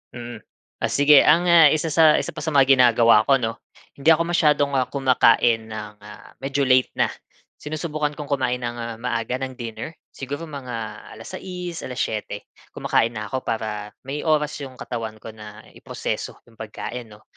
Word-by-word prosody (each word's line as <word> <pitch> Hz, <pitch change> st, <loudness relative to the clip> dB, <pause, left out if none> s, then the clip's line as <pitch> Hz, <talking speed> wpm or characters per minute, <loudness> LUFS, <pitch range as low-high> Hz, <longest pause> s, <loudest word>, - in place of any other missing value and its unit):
Mm. 120 Hz, -2 st, -8 dB, 0.4 s
O -, -, +1 dB
sige, 145 Hz, 0 st, +6 dB
ang 165 Hz, +4 st, +4 dB, 0.3 s
isa 155 Hz, +1 st, 0 dB
sa 155 Hz, -1 st, +6 dB
isa -, -, -5 dB
pa 155 Hz, -, -6 dB
sa 160 Hz, -, -2 dB
mga 135 Hz, -2 st, +5 dB
ginagawa 115 Hz, -3 st, +5 dB
ko, 135 Hz, -, +6 dB
'no? 115 Hz, -1 st, -2 dB, 0.4 s
Hindi 140 Hz, +3 st, +1 dB
ako 165 Hz, +1 st, +4 dB
masyadong, 150 Hz, -4 st, +2 dB
ah, 130 Hz, -1 st, +1 dB
kumakain 120 Hz, -4 st, +3 dB
ng, 105 Hz, -1 st, -7 dB
ah, 105 Hz, 0 st, -13 dB
medyo 140 Hz, +1 st, -1 dB
late 130 Hz, 0 st, +3 dB
na. -, -, +3 dB, 0.5 s
Sinusubukan 150 Hz, 0 st, -3 dB
kong 150 Hz, -2 st, -6 dB
kumain 130 Hz, -3 st, 0 dB
ng, 120 Hz, -1 st, -4 dB
ah, 115 Hz, -1 st, -5 dB
maaga 125 Hz, 0 st, -2 dB
ng 130 Hz, 0 st, -4 dB
dinner, 120 Hz, +5 st, -7 dB, 0.2 s
siguro 145 Hz, +5 st, -6 dB
mga 125 Hz, -6 st, -7 dB
alas -, -, -11 dB
sais, 180 Hz, -2 st, -6 dB
alas-siyete, 110 Hz, -4 st, -4 dB, 0.3 s
kumakain 115 Hz, +1 st, +1 dB
na 105 Hz, -2 st, -6 dB
ako 130 Hz, -1 st, -4 dB
para 105 Hz, -2 st, -4 dB
may 140 Hz, +4 st, -5 dB
oras 150 Hz, -2 st, +2 dB
'yong 135 Hz, -2 st, -8 dB
katawan 115 Hz, -3 st, -6 dB
ko -, -, -9 dB
na 105 Hz, 0 st, -12 dB, 0.2 s
iproseso -, -, -5 dB
'yong 115 Hz, -, -23 dB
pagkain, 115 Hz, +2 st, -7 dB
'no. 105 Hz, +1 st, -18 dB
130 Hz, 175 wpm, -22 LUFS, 115-145 Hz, 0.5 s, sige